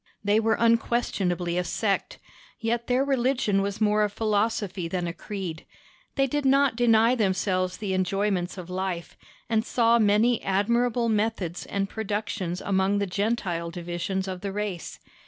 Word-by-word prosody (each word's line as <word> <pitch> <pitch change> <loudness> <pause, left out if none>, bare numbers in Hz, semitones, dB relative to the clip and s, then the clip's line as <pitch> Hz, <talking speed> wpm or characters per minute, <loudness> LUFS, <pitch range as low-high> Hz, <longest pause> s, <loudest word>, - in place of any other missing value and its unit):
They 205 +1 +3
were 225 0 +2
unquestionably 195 -7 +1
a - - 0
sect, 200 +3 -1 0.4
yet 235 0 -1
their 255 +2 +2
religion 250 -7 +1
was 200 +1 -3
more 210 -1 +3
a 210 - +1
philosophy 205 -3 -1
than 180 +1 -2
a 170 - -3
creed; 180 -3 -6 0.5
they 275 - +3
did 290 +2 -1
not 275 -2 +4
deny 230 0 +4
themselves 190 -4 0
the 200 -3 -3
enjoyments 185 0 0
of 180 -2 -7
life, 180 -2 -4 0.3
and 220 -2 +1
saw 235 -1 +3
many 215 +3 +3
admirable 235 +5 +1
methods 210 -5 -1
and 195 0 -1
productions 205 -4 -3
among 195 +1 +1
the 200 - +1
Gentile 190 -4 -1
divisions 175 +3 -3
of 185 -1 -5
the 200 -1 -3
race. 200 -3 -4
205 Hz, 150 wpm, -26 LUFS, 185-230 Hz, 0.5 s, not